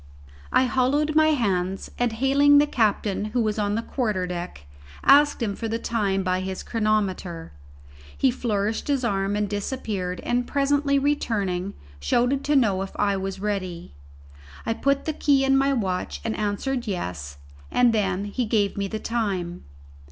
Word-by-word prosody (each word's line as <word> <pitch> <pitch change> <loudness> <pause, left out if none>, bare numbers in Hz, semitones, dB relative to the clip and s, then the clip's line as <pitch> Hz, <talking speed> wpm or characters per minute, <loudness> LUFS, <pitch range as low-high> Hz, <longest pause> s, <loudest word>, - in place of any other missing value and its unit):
I - - +4
hollowed 260 +5 +1
my 310 0 +5
hands, 195 -10 0
and, 245 -2 +1
hailing 280 +4 +4
the 290 - +6
captain, 210 -6 0
who 225 +3 -1
was 215 0 -1
on 205 0 0
the 230 - -2
quarter 215 -9 -1
deck, 175 - -6 0.4
asked 290 -2 +5
him 200 -3 -1
for 230 - -4
the 225 +1 -1
time 205 -5 -1
by 185 0 0
his 190 0 -4
chronometer. 195 -7 -1 0.7
He 265 - +3
flourished 220 -3 -2
his 280 -3 0
arm 195 -2 0
and 210 0 0
disappeared 200 -3 -3
and, 245 0 -1
presently 280 0 +2
returning, 200 -10 -1 0.2
shouted 245 - +1
to 295 - +2
know 205 -8 +3
if 195 - -5
I 200 -1 +2
was 195 0 -4
ready. 185 - -4 0.7
I 225 - +1
put 275 +4 0
the 315 - -1
key 280 -2 +2
in 270 0 +4
my 275 +1 +3
watch 190 -8 -2
and 225 -1 -2
answered 230 +5 -2
yes, 85 - -4 0.3
and 245 -2 +3
then 195 -2 0
he 235 +4 -2
gave 210 -3 +1
me 200 0 -1
the 220 - -4
time. 195 -7 -3
215 Hz, 165 wpm, -24 LUFS, 195-260 Hz, 0.7 s, the